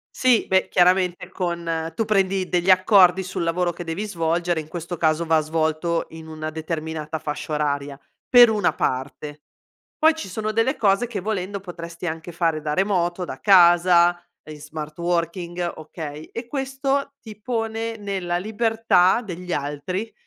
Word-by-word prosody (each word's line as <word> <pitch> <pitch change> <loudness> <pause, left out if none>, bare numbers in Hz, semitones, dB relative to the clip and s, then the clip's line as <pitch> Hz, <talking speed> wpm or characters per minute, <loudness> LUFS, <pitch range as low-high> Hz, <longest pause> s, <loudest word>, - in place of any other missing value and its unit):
Sì, 255 -3 +3
beh 190 0 +2
chiaramente 180 0 +2
con 170 -2 -3
tu 225 - +1
prendi 195 -3 +1
degli 180 0 -1
accordi 185 0 +5
sul 185 -1 -4
lavoro 175 +1 0
che 175 - -8
devi 170 +5 -4
svolgere, 170 -2 -1
in 155 - -11
questo 170 +1 -6
caso 155 +1 +1
va 160 -1 +3
svolto 160 +2 -1
in 160 0 -10
una 155 0 -5
determinata 160 -1 -4
fascia 150 0 -4
oraria, 145 -1 -2 0.3
per 245 -2 +8
una 205 -7 +1
parte. 145 +3 -3 0.6
Poi 320 +1 +4
ci 320 - -6
sono 215 +3 -3
delle 225 +4 +1
cose 200 +2 +2
che 230 -4 -5
volendo 200 0 -3
potresti 170 -2 -8
anche 165 +1 -5
fare 165 -2 0
da 150 -1 -2
remoto, 180 -1 0
da - - -8
casa, 175 -2 +5 0.3
in 155 -1 -9
smart 150 0 -8
working, 175 0 -2
okay, 155 -1 -8
e 230 +1 -6
questo 275 +1 -2
ti 215 -2 -11
pone 225 -1 -3
nella 190 -4 -2
libertà 220 -1 +2
degli 180 -4 -6
altri 150 +9 -3
175 Hz, 155 wpm, -23 LUFS, 160-200 Hz, 0.6 s, per